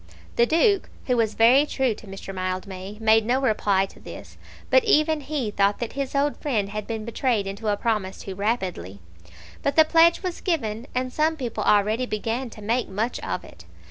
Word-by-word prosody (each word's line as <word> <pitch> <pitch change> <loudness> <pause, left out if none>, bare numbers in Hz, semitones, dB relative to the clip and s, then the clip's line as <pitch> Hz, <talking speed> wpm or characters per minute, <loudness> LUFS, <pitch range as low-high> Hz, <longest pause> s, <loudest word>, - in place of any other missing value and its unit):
The 235 - +4
Duke, 375 - +2 0.2
who 250 - +1
was 225 -2 +1
very 245 +5 +6
true 265 -5 0
to 210 - -14
Mr. 195 0 -8
Mildmay, 185 +2 -5
made 220 0 +4
no 245 +4 +1
reply 210 -6 +2
to - - -16
this, - - -11 0.4
but - - +6
even 310 -7 +3
he 275 -6 -3
thought 200 0 +2
that 235 - -5
his 275 0 -4
old 285 +1 +1
friend 220 -10 -1
had 210 0 -5
been 220 -2 -4
betrayed 230 -2 0
into 200 +3 -5
a 205 -1 +1
promise 210 -5 -2
too 195 - -6
rapidly. 185 - -3 0.6
But 280 - -1
the 315 - +7
pledge 330 +3 +4
was 365 -2 -4
given, 235 - -2
and 255 0 -1
some 315 +1 +1
people 245 -5 -3
already 215 +4 +2
began 230 +4 -3
to 215 -1 -12
make 235 +3 0
much 215 +5 -2
of - - -4
it. - - -15
225 Hz, 195 wpm, -24 LUFS, 205-275 Hz, 0.6 s, the